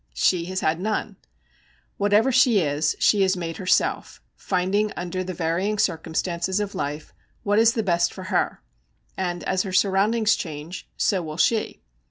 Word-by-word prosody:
She 170 - +2
has 185 +1 -3
had 160 +2 0
none. 215 +3 -3 0.8
Whatever 205 +5 +3
she 250 -4 +4
is, 150 -1 0
she 205 - +3
has 190 -1 +2
made 165 -2 -4
herself, 185 -1 0 0.2
finding 195 +3 0
under 180 +1 -3
the 185 -1 -6
varying 180 +5 -1
circumstances 175 0 -1
of 205 -1 -3
life 150 -4 -5 0.3
what 205 +1 +2
is 230 0 +5
the 225 -3 -1
best 170 -3 +1
for - - -9
her; - - 0 0.5
and 175 -2 -3
as 190 -1 0
her 190 - -4
surroundings 210 +4 +2
change, 155 +2 -7
so 190 -3 +1
will 155 -2 -7
she. 215 - 0
185 Hz, 160 wpm, -24 LUFS, 170-205 Hz, 0.8 s, is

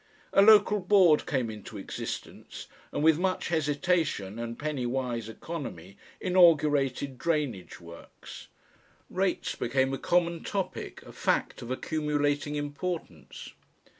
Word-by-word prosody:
A - - +6
Local 210 0 +6
Board 185 -5 +4
came 125 -6 -1
into 105 0 -9
existence, 95 - -7 0.3
and - - -2
with 160 0 +5
much 185 0 -1
hesitation 150 - 0
and 115 0 -5
penny 145 -5 -2
wise 120 -3 -2
economy 110 - -7 0.2
inaugurated 145 -7 +3
drainage 145 - -2
works. 85 -1 -12 0.6
Rates - - -1
became 130 +2 0
a 135 - -3
common 170 -1 +1
topic, 195 -2 -4
a - - -12
fact - - -1
of 120 - -8
accumulating 145 +1 -1
importance. 145 - -5
145 Hz, 115 wpm, -28 LUFS, 120-170 Hz, 0.6 s, A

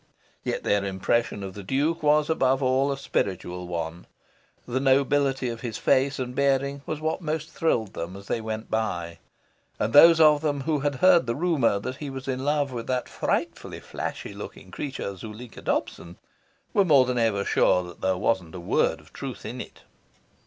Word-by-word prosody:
Yet - - -2
their 100 -1 +2
impression 100 +2 0
of 95 -1 -6
the 100 - -8
Duke 145 - 0
was 150 0 +3
above 135 -4 +2
all 130 +2 +2
a 140 - -2
spiritual 90 -8 -2
one. 85 -1 -5 0.6
The 125 +1 -1
nobility 135 0 +2
of 115 -1 -6
his 115 -4 -4
face 135 +1 +2
and 125 -1 -4
bearing 140 +1 +1
was 155 - -3
what 160 +3 -2
most 155 0 -3
thrilled 115 - 0
them 85 +3 -5
as 100 - -12
they 115 - -2
went 110 0 -5
by; 85 -7 -2 0.6
and 110 - -1
those 165 +3 +9
of 150 -2 +6
them 145 -3 -1
who 150 +1 0
had 145 0 -1
heard 175 -8 +6
the 115 - 0
rumour 150 - +2
that 130 +6 -5
he 145 -1 -6
was 135 0 -7
in 130 0 -2
love 145 -1 +1
with 120 -2 -5
that 125 -1 -1
frightfully - - -2
flashy - - -6
looking - - -9
creature, 130 -8 -5
Zuleika 110 +5 -9
Dobson, 85 +1 -3 0.6
were 200 - +5
more 145 -8 +5
than 125 -1 -1
ever 105 -4 +1
sure 90 -1 +2
there 95 +2 -1
wasn't 95 -4 -1
a - - -5
word 85 - +1
of - - -22
truth - - -7
in - - -5
it. - - -12
130 Hz, 185 wpm, -26 LUFS, 100-145 Hz, 0.6 s, those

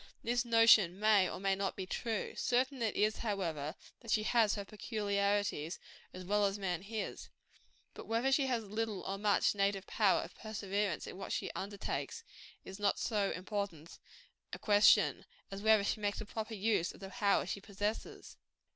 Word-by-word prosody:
This 240 +1 +1
notion 225 -6 +5
may 210 -3 +4
or - - -6
may 195 0 +1
not 195 0 -2
be 190 - -4
true. 225 +3 -3
Certain 255 +1 0
it 225 -2 0
is, 215 +1 +2
however, 170 -9 -3 0.2
that 230 - -13
she 215 -1 +2
has 220 -2 +3
her 200 -1 -5
peculiarities, 200 -6 -1 0.3
as 185 0 -9
well 205 +2 +2
as 195 +1 -3
man 180 -4 -2
his. 210 +1 -5 0.6
But - - -10
whether 230 +4 +1
she 270 0 +3
has 240 -3 0
little 215 -1 -3
or 195 +1 -4
much 205 -1 +3
native 200 -1 0
power 205 -2 +2
of - - -10
perseverance 205 -4 -3
in - - -8
what - - -6
she - - -2
undertakes, 200 - -4 0.4
is 190 +1 -9
not 205 -1 +2
so 205 -4 0
important 185 -4 -5 0.5
a - - -3
question, 205 -1 +4 0.3
as 195 0 -6
whether 220 -1 +5
she 210 - -1
makes 205 0 -1
a 215 - -5
proper 220 +1 -5
use 200 -4 +1
of - - -15
the 195 -1 -8
power 200 -5 +2
she 195 +2 -4
possesses. 205 +2 -5
205 Hz, 175 wpm, -34 LUFS, 195-220 Hz, 0.6 s, notion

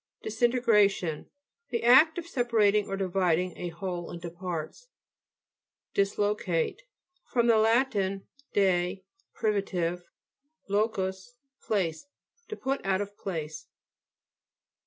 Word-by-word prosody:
DISINTEGRATION 220 -7 +2 0.4
The 235 -2 -2
act 265 +8 +6
of 345 - -4
separ 240 -8 -1
ating 205 0 +4
or 195 - -3
dividing 185 -2 +1
a 175 - -4
whole 175 0 -5
into 170 0 -7
parts. 175 - -6 1.1
DISLOCATE 200 - 0 0.5
fr, 240 - +2
lat. 230 +3 +4 0.6
de, 190 -1 +1 0.3
privitive, 185 -5 -1 0.7
lo 205 +3 +2
cus, 190 +2 -5 0.3
place. 185 - -1 0.4
To 430 - -5
put 270 -6 -2
out 195 0 +1
of 205 0 -6
place. 160 -6 -5
200 Hz, 100 wpm, -28 LUFS, 180-230 Hz, 1.1 s, act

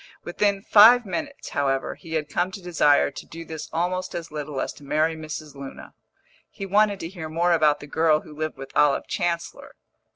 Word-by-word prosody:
Within 200 +2 0
five 230 +4 +7
minutes, 280 +8 -5
however, 135 -1 -1
he 165 -3 -11
had 155 -2 -1
come 175 +4 -1
to 200 - -6
desire 165 -6 +3
to - - -9
do 165 +1 -9
this 160 -2 -7
almost 180 +3 -2
as 170 -2 -6
little 150 -2 -5
as - - -3
to - - -16
marry 155 +3 +1
Mrs. 155 -1 -7
Luna. 140 -1 -10 0.6
He 195 - -7
wanted 205 +1 +2
to 165 - -4
hear 165 -3 -7
more 170 +3 +1
about 155 -3 +3
the - - -8
girl 155 +1 +2
who 150 - -13
lived 155 -1 -4
with 135 0 -10
Olive 145 -2 +3
Chancellor. 170 -2 -3
160 Hz, 195 wpm, -24 LUFS, 150-185 Hz, 0.6 s, five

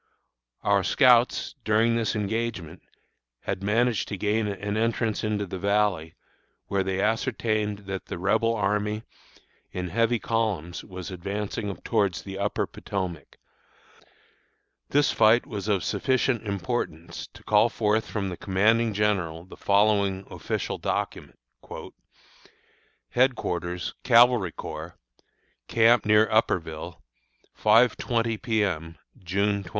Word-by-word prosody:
Our 100 -1 +3
scouts, 125 -1 +4
during 110 +2 +3
this 115 -1 0
engagement, 105 -5 -3 0.6
had - - -3
managed 115 +3 +1
to 100 - -4
gain 105 +2 0
an 100 +1 -3
entrance 115 0 0
into 105 -1 -1
the 95 0 -6
Valley, 100 -5 0 0.5
where 100 -1 0
they 95 0 -2
ascertained 105 -1 -1
that 95 -1 -5
the - - -5
Rebel 110 +5 +1
army, 105 +1 -1 0.7
in 90 -1 -4
heavy 115 +5 +2
columns, 105 -8 -2
was 95 -1 -8
advancing 100 +2 -4
towards 100 -8 0
the 95 0 -7
Upper 100 +1 0
Potomac. 90 -7 -5 1.5
This 145 0 +3
fight 110 +3 +4
was 100 -1 -5
of 100 -4 +1
sufficient 130 -3 0
importance 95 -4 -3
to - - -14
call - - +4
forth 105 +1 0
from 100 -3 -2
the 90 - -6
commanding 110 +3 +2
general 95 -6 0
the 95 - -12
following 100 -1 +2
official - - -3
document: - - -3 1.8
HEADQUARTERS 90 -9 0
CAVALRY 120 -6 +5
CORPS, - - -7 0.7
Camp 115 0 +4
near 105 +1 +5
Upperville, 85 -6 -1 0.5
5.20 115 0 +2
P. 110 -4 +1
M., 80 -4 -3 0.3
June 100 +3 0
21. - - -12
105 Hz, 115 wpm, -26 LUFS, 95-115 Hz, 1.8 s, CAVALRY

